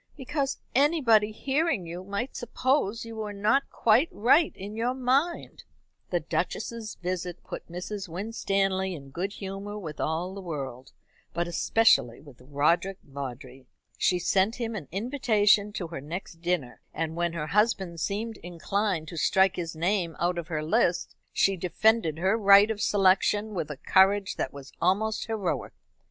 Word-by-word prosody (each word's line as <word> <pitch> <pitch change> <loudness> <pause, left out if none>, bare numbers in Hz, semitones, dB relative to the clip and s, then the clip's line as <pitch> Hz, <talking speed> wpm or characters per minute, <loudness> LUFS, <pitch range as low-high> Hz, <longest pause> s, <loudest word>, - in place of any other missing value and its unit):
"Because 275 0 -2 0.2
anybody 255 -7 +4
hearing 270 - 0
you 175 +2 -7
might 200 +7 -4
suppose 240 -2 0
you 225 -1 -8
were 210 -1 -4
not 215 +7 +1
quite 235 +8 +3
right 280 +9 +4
in 200 +3 -8
your 240 +3 -1
mind." 270 +7 0 0.5
The - - +1
Duchess's 230 -2 -3
visit 180 -1 -4
put - - -8
Mrs. 190 +2 -5
Winstanley 195 0 -1
in 140 -3 -11
good 185 +7 -3
humour 200 +1 -6
with 160 -7 -7
all 170 +4 -2
the 200 - -7
world, 135 -7 -6 0.4
but 170 0 0
especially 170 - +3
with 140 -4 -16
Roderick 150 +8 +1
Vawdrey. 135 -1 -8 0.3
She 180 - +2
sent 195 +5 +2
him 230 -2 -3
an 165 -9 -6
invitation 210 - +2
to 175 -5 -4
her 165 -4 -6
next 165 +2 -7
dinner, 170 -8 -2
and 160 0 -2
when 170 0 -1
her 160 -3 -3
husband 190 -1 +1
seemed 215 +6 -3
inclined 175 0 -2
to 170 - -8
strike 190 +4 +3
his 165 -2 -4
name 175 0 0
out 175 0 0
of 165 - -6
her 155 -3 -2
list, 170 +2 +1 0.2
she 195 - +2
defended 180 -1 +1
her 190 +5 +2
right 200 +1 +7
of 210 -1 -4
selection 205 +2 +3
with 170 -6 -3
a 150 - -6
courage 195 +5 +3
that - - -2
was 140 -1 -11
almost 210 +6 +1
heroic. 215 -6 -2
195 Hz, 155 wpm, -27 LUFS, 170-220 Hz, 0.5 s, right